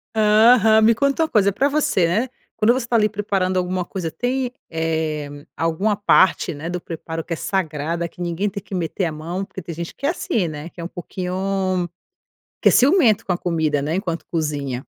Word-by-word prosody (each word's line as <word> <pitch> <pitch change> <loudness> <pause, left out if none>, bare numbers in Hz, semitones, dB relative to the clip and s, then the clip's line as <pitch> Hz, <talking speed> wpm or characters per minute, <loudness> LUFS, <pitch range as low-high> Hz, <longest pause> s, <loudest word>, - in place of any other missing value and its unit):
Aham, 220 +1 +5
me 225 +1 +6
conta 280 +6 +1
uma 315 - -1
coisa 200 -2 +3
pra 275 +8 +2
você, 280 - +2
né, 215 +10 0 0.3
quando 225 +3 +4
você 255 -2 -2
está 235 0 +2
ali 210 -1 +4
preparando 200 -3 -1
alguma 180 0 -1
coisa 175 -5 -4
tem, 250 0 -1 0.2
eh, 155 -3 -3
alguma 180 +6 0
parte, 190 -3 +3
né, 155 +3 -6
do 180 0 -3
preparo 165 -1 -6
que 175 - -16
é - - -1
sagrada 165 -2 -2
que 180 - -13
ninguém 175 +4 -1
tem 200 0 -6
que 195 - -7
meter 180 +2 -1
a 165 - -1
mão 170 +5 -4
porque 190 -1 -9
tem 170 0 -7
gente 170 +1 -6
que 280 - -6
é 290 - +3
assim 230 - -1
né, 150 +1 -7
que 170 - -11
é - - -5
um - - -3
pouquinho, 185 0 -2 0.7
que - - +6
é - - 0
ciumento 255 - +4
com 190 - +1
a 175 - -1
comida 160 -5 0
né 155 +3 -2
enquanto 170 -4 -3
cozinha. 145 -5 -3
185 Hz, 210 wpm, -21 LUFS, 165-215 Hz, 0.7 s, me